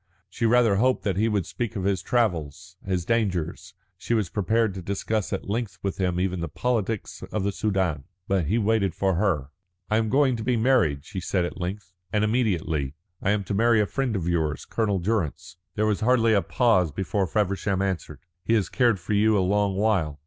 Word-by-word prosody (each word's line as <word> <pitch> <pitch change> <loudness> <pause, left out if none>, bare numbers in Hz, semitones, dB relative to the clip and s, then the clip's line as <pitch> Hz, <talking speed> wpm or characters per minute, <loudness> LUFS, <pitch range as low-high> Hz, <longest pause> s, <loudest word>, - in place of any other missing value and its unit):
She 115 - 0
rather 115 -3 +4
hoped 130 +4 +2
that 100 -4 0
he 110 +3 +2
would 105 -6 0
speak 120 -2 -4
of 95 - -3
his 95 -2 0
travels, 90 - -1
his 90 -3 -2
dangers; 95 -5 -1 0.2
she 120 - -1
was 105 -6 -1
prepared 110 +1 +1
to 95 - -6
discuss 100 +3 -2
at - - -3
length 105 -2 -3
with 100 0 -3
him 90 -2 0
even 90 -1 -1
the 85 - -2
politics 115 +2 -2
of 105 - -1
the 100 - 0
Soudan. 95 -9 -1 0.2
But 95 -5 +1
he 105 +8 +1
waited 105 -4 +1
for 95 -1 +1
her. 85 -7 0 0.4
"I 110 - +4
am 110 -1 +1
going 135 0 +3
to 110 - -5
be 125 +1 +1
married," 110 - +2
she 95 - -5
said 90 -1 0
at 90 - -6
length, 90 +1 -5 0.2
"and 105 0 +1
immediately. 85 - 0 0.3
I - - 0
am 105 0 +1
to 100 - -4
marry 115 +2 +4
a 105 - +3
friend 130 +1 -2
of 90 -4 -2
yours, 80 -4 -1
Colonel 105 -4 0
Durrance." 90 -3 -2 0.2
There 105 - +1
was 105 -2 +1
hardly 115 -1 +3
a 100 - +4
pause 95 - +2
before 95 +4 -1
Feversham 100 0 0
answered: 95 -3 -3 0.2
"He 115 - +2
has 105 -4 +1
cared 120 -6 +2
for 90 +5 -3
you 105 +1 +4
a 95 - +2
long 100 0 +1
while. 95 -8 +1
100 Hz, 205 wpm, -25 LUFS, 90-110 Hz, 0.4 s, rather